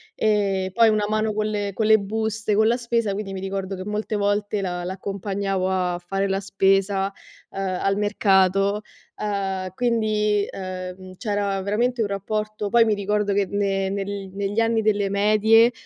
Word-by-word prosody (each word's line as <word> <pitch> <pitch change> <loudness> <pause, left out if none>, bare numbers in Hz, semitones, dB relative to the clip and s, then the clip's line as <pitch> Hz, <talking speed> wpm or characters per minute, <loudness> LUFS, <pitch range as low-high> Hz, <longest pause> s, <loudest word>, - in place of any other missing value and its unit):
ehm, 195 -3 +1
poi 230 0 +5
una 210 -1 +1
mano 215 0 0
con 215 0 -1
le 205 -1 -2
con 220 - -1
le 220 0 +6
buste, 215 +1 -2
con 220 +1 +4
la 235 - +3
spesa, 235 -3 0
quindi 195 -1 -4
mi 190 - -4
ricordo 195 0 -3
che 185 - -5
molte 210 +1 -3
volte 205 0 0
l' - - -2
a 180 -1 -3
l'accompagnavo 195 0 -2
a 180 -2 0
fare 195 +2 -1
la 195 0 0
spesa, 195 0 +2 0.4
ehm, 190 -2 -2
al 195 0 +1
mercato, 200 -1 +2 0.4
uhm, 195 -3 -2
quindi, 215 -3 +1
ehm, 185 0 -7
c'era 200 -2 -1
veramente 235 +5 0
un 210 - +1
rapporto 210 +1 -3
poi 235 +1 +5
mi 215 - +2
ricordo 205 0 0
che 200 0 +2
ne 195 -1 0
nel 195 -1 -4
negli 200 +2 -2
anni 225 0 +2
delle 205 -2 +1
medie, 215 +3 +4
200 Hz, 170 wpm, -23 LUFS, 195-215 Hz, 0.4 s, le